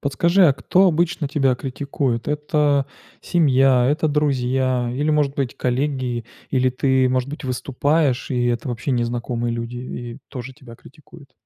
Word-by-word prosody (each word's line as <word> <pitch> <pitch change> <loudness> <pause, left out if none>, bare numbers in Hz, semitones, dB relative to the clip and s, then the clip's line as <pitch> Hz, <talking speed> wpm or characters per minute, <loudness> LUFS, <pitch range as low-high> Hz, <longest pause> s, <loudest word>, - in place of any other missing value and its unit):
Подскажи, 170 +6 +3
а - - +4
кто 185 +7 +2
обычно 170 -3 0
тебя 135 -3 +2
критикует? 135 -1 -3
Это 150 -2 +1 0.3
семья, 135 -6 +3
это 155 +3 +1
друзья 130 -4 0
или, 145 +4 0
может 145 -2 +1
быть, 135 -3 -2
коллеги, 125 -2 -1 0.3
или 130 -1 +2
ты, 130 0 +2
может 130 +1 0
быть, 150 0 -7
выступаешь, 135 +2 0
и 125 -1 0
это 120 +2 -1
вообще 120 +3 -3
незнакомые 120 -1 -1
люди, 115 +1 -5
и 120 -1 -7
тоже 130 -1 -7
тебя 130 -5 -14
критикуют? 145 +2 -17
135 Hz, 145 wpm, -21 LUFS, 125-150 Hz, 0.3 s, а